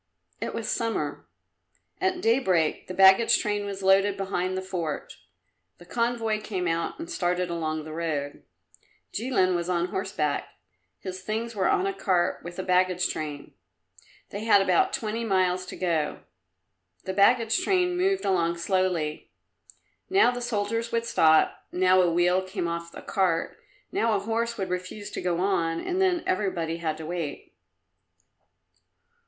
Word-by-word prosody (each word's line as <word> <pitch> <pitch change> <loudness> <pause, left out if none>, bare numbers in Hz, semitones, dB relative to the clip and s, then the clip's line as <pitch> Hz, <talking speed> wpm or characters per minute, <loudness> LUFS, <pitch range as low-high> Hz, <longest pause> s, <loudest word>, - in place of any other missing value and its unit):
It - - -3
was 225 -1 -4
summer. 230 -1 -2 0.7
At 375 -1 0
daybreak 190 - +2
the 185 - -5
baggage 195 +4 +6
train 205 -2 -2
was 195 -1 -6
loaded 195 +1 +4
behind 185 -1 -2
the 190 - -3
fort; 175 -6 -4 0.6
the 175 - -15
convoy 230 0 -1
came 190 -4 -3
out 165 0 -1
and 330 - -7
started 180 - -1
along 155 -2 -2
the 155 0 -8
road. 155 -4 -3 0.7
Jilin 210 -6 +1
was 175 0 -2
on 175 0 0
horseback; 150 -6 -2 0.5
his 185 -1 -7
things 225 +4 -3
were 195 -3 +1
on 390 -1 +2
a 390 - -1
cart 185 - 0
with 175 0 -8
the 185 - -4
baggage 180 0 +2
train. 150 -2 -5 0.8
They 205 +2 -5
had 220 -3 +6
about 185 -3 +3
twenty 230 -3 -3
miles 185 -3 +1
to - - -7
go. 165 -5 -1 0.8
The 190 - -3
baggage 225 - +3
train 360 -2 +2
moved 385 +2 +1
along 170 -2 +1
slowly; 170 -4 -1 0.8
now 380 -10 +5
the 245 0 -5
soldiers 230 0 -2
would 230 0 0
stop, 160 -9 +3
now 185 +1 +4
a 175 - +3
wheel 175 +2 +3
came 185 -2 -4
off 170 0 -4
a - - -9
cart, 180 -4 0 0.4
now 230 - +1
a - - +1
horse 230 +2 -2
would 190 - -3
refuse 180 +3 -5
to - - -4
go 175 -2 0
on, 165 -4 +1
and 365 +1 -2
then 360 -3 +2
everybody 175 -4 -1
had 160 -2 -2
to 160 - -7
wait. 165 -3 -5
185 Hz, 155 wpm, -26 LUFS, 175-225 Hz, 0.8 s, baggage